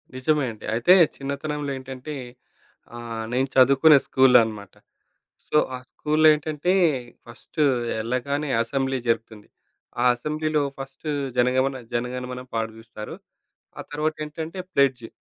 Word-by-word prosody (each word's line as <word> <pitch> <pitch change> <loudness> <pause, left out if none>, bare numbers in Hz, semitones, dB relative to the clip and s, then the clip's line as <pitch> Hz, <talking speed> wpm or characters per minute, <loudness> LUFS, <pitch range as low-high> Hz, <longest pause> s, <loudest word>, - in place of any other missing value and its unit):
నిజమే 145 +2 +1
అండి. 110 - -12
అయితే 120 +10 +5 0.2
చిన్నతనంలో 140 +1 -4
ఏంటంటే, 130 +3 -7 0.8
ఆహ్, 115 -1 -5
నేను 130 +2 +1
చదువుకునే 140 +3 +7
స్కూలనమాట. 115 -6 +3 0.7
సో, 150 - +2 0.2
ఆ - - -4
స్కూలులో 155 +1 +2
ఏంటంటే 155 +3 -1 0.5
ఫస్టు 140 +6 -4 0.4
ఎళ్ళగానే 140 +6 -2
అసెంబ్లీ 135 +1 -1
జరుపుతుంది. 115 -2 -2 0.5
ఆ - - +2
అసెంబ్లీలో 150 +3 -1 0.2
ఫస్టు 135 +3 -7 0.3
జనగమణ 130 +2 +2 0.2
జనగణమన 125 +1 -3
పాడిపిస్తారు. 110 -1 -5 0.6
ఆ - - -5
తరువాతేంటంటే, 155 +3 -4 0.2
ప్లెడ్జ్. 130 -4 +2
135 Hz, 105 wpm, -24 LUFS, 120-150 Hz, 0.8 s, చదువుకునే